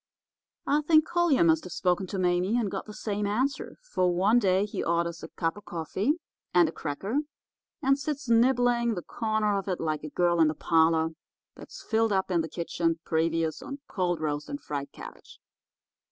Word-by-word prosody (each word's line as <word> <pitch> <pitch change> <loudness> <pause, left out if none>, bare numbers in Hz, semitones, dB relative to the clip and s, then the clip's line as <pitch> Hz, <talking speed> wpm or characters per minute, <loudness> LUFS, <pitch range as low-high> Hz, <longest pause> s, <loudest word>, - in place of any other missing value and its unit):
"I 295 +2 +2
think 310 0 +4
Collier 345 - +3
must 160 -1 +3
have 180 - -7
spoken 180 +1 0
to 195 - -4
Mame 180 +4 +1
and 210 -5 -1
got - - -5
the 210 - -8
same 205 -1 -2
answer, 260 +6 -1
for 185 - +1
one 200 +7 +3
day 190 -2 +2
he 210 - -4
orders 170 0 -1
a - - -7
cup 165 +2 -2
of 205 - -12
coffee 180 - -1 0.4
and 175 -2 +6
a - - -3
cracker, 190 - -3 0.6
and 275 +1 +3
sits 290 -1 -4
nibbling 235 0 +3
the 175 - -5
corner 215 -3 0
of 195 - -8
it 185 -2 -1
like 155 -2 -2
a 155 - -5
girl 175 +1 +1
in 160 - +6
the 155 - -1
parlour, 160 0 +2 0.4
that's - - -12
filled 225 -1 +1
up 190 -1 0
in 170 -2 +2
the 160 - -5
kitchen, 170 -1 -1
previous, 165 0 0
on 280 0 -7
cold 175 -4 -1
roast 150 -1 -3
and 285 - -4
fried 140 - -5
cabbage. - - -12
185 Hz, 190 wpm, -28 LUFS, 165-235 Hz, 0.6 s, and